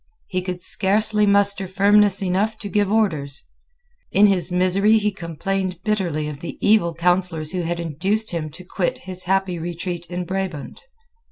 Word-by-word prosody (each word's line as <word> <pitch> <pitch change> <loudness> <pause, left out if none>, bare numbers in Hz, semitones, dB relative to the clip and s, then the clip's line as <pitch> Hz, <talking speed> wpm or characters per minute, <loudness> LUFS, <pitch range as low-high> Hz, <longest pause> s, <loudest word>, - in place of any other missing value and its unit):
He 185 -1 -1
could 180 -1 -5
scarcely 210 +1 +2
muster 200 -1 +3
firmness 200 +1 +4
enough 200 +4 0
to 205 - -7
give 205 +1 +1
orders. 155 -11 0 0.7
In 205 - +5
his 195 -3 +1
misery 190 +4 +3
he 210 -1 0
complained 185 +1 -3
bitterly 180 -8 -1
of 150 -2 -7
the 170 - -7
evil 205 -6 +3
counsellors 175 -2 0
who 185 -1 -2
had 170 0 -3
induced 190 +7 -1
him 160 -3 -3
to 175 +5 -12
quit 180 -1 -2
his 185 -1 -6
happy 190 -1 0
retreat 175 +1 -5
in 180 +1 -4
Brabant. 185 -5 -4
185 Hz, 160 wpm, -21 LUFS, 170-200 Hz, 0.7 s, In